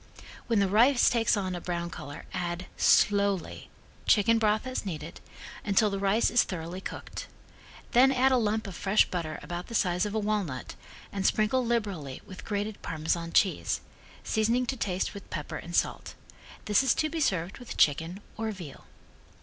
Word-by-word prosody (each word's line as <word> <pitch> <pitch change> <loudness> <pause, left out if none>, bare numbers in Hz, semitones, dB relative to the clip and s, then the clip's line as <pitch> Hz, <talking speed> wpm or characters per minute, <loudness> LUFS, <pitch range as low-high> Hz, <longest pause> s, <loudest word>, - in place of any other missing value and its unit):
When 230 - +2
the 200 -1 +3
rice 240 +6 +5
takes 230 -2 +2
on 185 -2 -2
a 175 - -5
brown 170 -1 -3
color 145 -3 -8
add, 175 0 -3
slowly, 200 -3 +2 0.4
chicken 225 +2 +4
broth 215 +1 +2
as 255 0 -3
needed, 165 -4 -6 0.4
until 210 +1 +3
the 195 - -2
rice 200 +3 +2
is 240 - +5
thoroughly 175 +1 -5
cooked. - - -7 0.6
Then 260 +2 +6
add 265 0 +3
a 260 - +4
lump 220 -1 0
of 195 -3 -6
fresh 200 +4 +3
butter 165 -4 -4
about 175 +3 -5
the 230 - -6
size 180 0 +2
of 210 - -5
a - - +2
walnut, 205 -11 -2 0.4
and 195 -1 -3
sprinkle 220 +6 +2
liberally 200 - -2
with 185 - -10
grated 205 0 -3
Parmesan 165 +1 -2
cheese, 190 - +2 0.4
seasoning 230 +3 +1
to 265 - -2
taste 190 -6 -2
with 200 -2 -10
pepper 150 -3 -5
and 175 +1 -6
salt. - - -1 0.5
This 210 +3 +4
is 265 -3 +3
to 310 - +1
be 325 +1 -4
served 190 - 0
with 245 - -8
chicken 165 +6 +2 0.2
or 220 0 -2
veal. 175 -9 -10
200 Hz, 175 wpm, -28 LUFS, 175-225 Hz, 0.6 s, Then